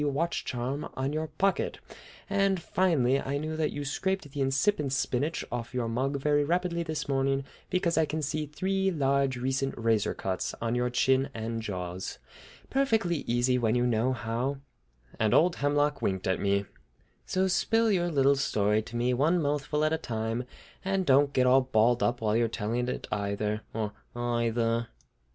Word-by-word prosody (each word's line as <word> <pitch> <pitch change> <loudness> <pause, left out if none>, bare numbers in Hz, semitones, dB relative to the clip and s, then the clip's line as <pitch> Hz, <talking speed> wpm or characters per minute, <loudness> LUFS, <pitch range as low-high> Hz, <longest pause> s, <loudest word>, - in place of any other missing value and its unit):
watch 165 +5 -1
charm 130 +3 -3
on 135 +2 -2
your 155 +1 -1
pocket; 190 +6 0 0.5
and, 195 -2 +2
finally, 155 -8 +2
I 140 +1 -2
knew 155 +2 -3
that 155 -1 0
you 145 0 -5
scraped 190 +2 -2
the 140 0 -3
incipient 135 +2 +1
spinach 135 +4 -1
off 120 +1 -4
your 120 -2 0
mug 130 +5 -1
very 145 +1 +2
rapidly 170 +2 0
this 160 -2 -3
morning 135 0 +1 0.2
because 180 -3 +1
I 160 - +4
can 155 +1 -3
see 150 +1 -2
three 190 +5 0
large 140 -5 +1
recent 135 +2 -1
razor 115 -2 +1
cuts 95 -1 -3
on 115 0 -1
your 125 0 +1
chin 130 +2 +2
and 115 0 -3
jaws! 90 -3 -5 0.5
Perfectly 225 -11 +2
easy 120 +2 +2
when 115 -1 +1
you 125 0 +2
know 120 +1 +2
how!" 125 +3 -2 0.6
And 110 -2 +3
old 175 +2 +4
Hemlock 145 0 +1
winked 95 -1 -1
at 95 -1 +1
me. 100 0 +1 0.6
"So 190 +1 +1
spill 225 +5 +2
out - - +3
your 175 -2 +1
little 140 -3 +4
story 105 -5 +1
to 110 - -10
me, 120 +1 +1
one 155 +8 +2
mouthful 150 0 0
at 155 - +1
a 160 - 0
time, 115 +1 -3 0.4
and 195 -1 0
don't 140 0 +4
get 130 -2 +2
all 130 +1 +6
balled 120 -1 +2
up 120 0 +1
while 110 -1 +1
you're 115 0 +3
telling 115 +2 -2
it 125 - -4
either, 105 +1 -1
or 110 -2 -2 0.2
eyether." 115 -1 0
135 Hz, 175 wpm, -29 LUFS, 115-155 Hz, 0.6 s, all